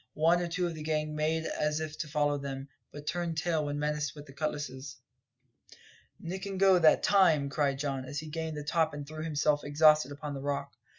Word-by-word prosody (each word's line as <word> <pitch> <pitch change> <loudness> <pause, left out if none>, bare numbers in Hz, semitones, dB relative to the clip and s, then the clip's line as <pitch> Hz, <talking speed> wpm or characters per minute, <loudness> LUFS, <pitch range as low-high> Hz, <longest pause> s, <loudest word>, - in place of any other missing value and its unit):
One 165 +3 +3
or 175 - -1
two 180 +1 -1
of 170 - -2
the 155 - -8
gang 155 0 -1
made 160 +1 0
as 150 0 -1
if 155 -1 -4
to 160 - -3
follow 145 -1 +1
them, 135 0 -6 0.2
but 145 0 -9
turned 170 -1 -2
tail 160 -2 0
when 145 0 -2
menaced 150 0 -1
with 145 -1 -10
the 135 - -13
cutlasses. 145 -3 -4 1.2
"Nick 190 +4 -5
and 195 -1 -4
go 190 -2 +6
that 160 -2 +5
time!" 165 -8 +4
cried 140 -1 0
Don, 135 -2 -2
as 135 +3 -6
he 155 - -4
gained 160 0 -4
the 150 - -4
top 160 0 +1
and 145 -1 -7
threw 155 +1 -6
himself 150 -2 +1
exhausted 150 -1 +4
upon 145 +1 -6
the 135 - -5
rock. 140 0 -3
150 Hz, 215 wpm, -30 LUFS, 145-160 Hz, 1.2 s, go